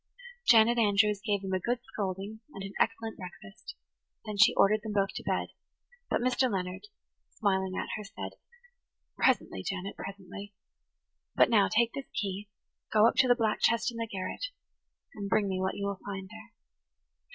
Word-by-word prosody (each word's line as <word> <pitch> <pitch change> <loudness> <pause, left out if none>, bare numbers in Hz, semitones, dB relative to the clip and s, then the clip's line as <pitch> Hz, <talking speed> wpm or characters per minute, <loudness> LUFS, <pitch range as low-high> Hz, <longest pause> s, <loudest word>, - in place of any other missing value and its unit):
Janet 235 +1 +6
Andrews 205 -1 +3
gave 205 -3 0
them 190 -1 -3
a 185 - +2
good 240 +6 0 0.2
scolding 200 +2 -3 0.2
and 195 - -6
an 195 0 -7
excellent 225 -1 0
breakfast. 195 - -10 0.5
Then 215 -1 -4
she 205 +1 +6
ordered 210 +2 +4
them 215 -1 -5
both 195 -1 +2
to - - -6
bed; - - -1 0.6
but - - +1
Mr. 255 0 +2
Leonard, 185 - -3 0.4
smiling 190 -3 0
at - - -3
her, 210 - -6
said: 200 - -7 0.8
"Presently, - - +2
Janet, 195 0 -4
presently. 200 +1 -8 0.8
But - - +5
now 205 -3 +5
take 235 +1 +2
this 275 - -6
key, 200 0 -3 0.4
go 215 +1 +6
up - - +3
to 260 - +5
the 245 - +6
black 220 -3 0
chest 230 +1 +3
in 230 - -9
the 230 0 -2
garret, 190 - -3 0.7
and 200 -1 -5
bring 205 0 +2
me 185 -1 -1
what 190 0 -1
you 200 - -3
will 200 -1 -3
find 190 -1 -5
there." 225 +1 -12
205 Hz, 175 wpm, -30 LUFS, 195-225 Hz, 0.8 s, Janet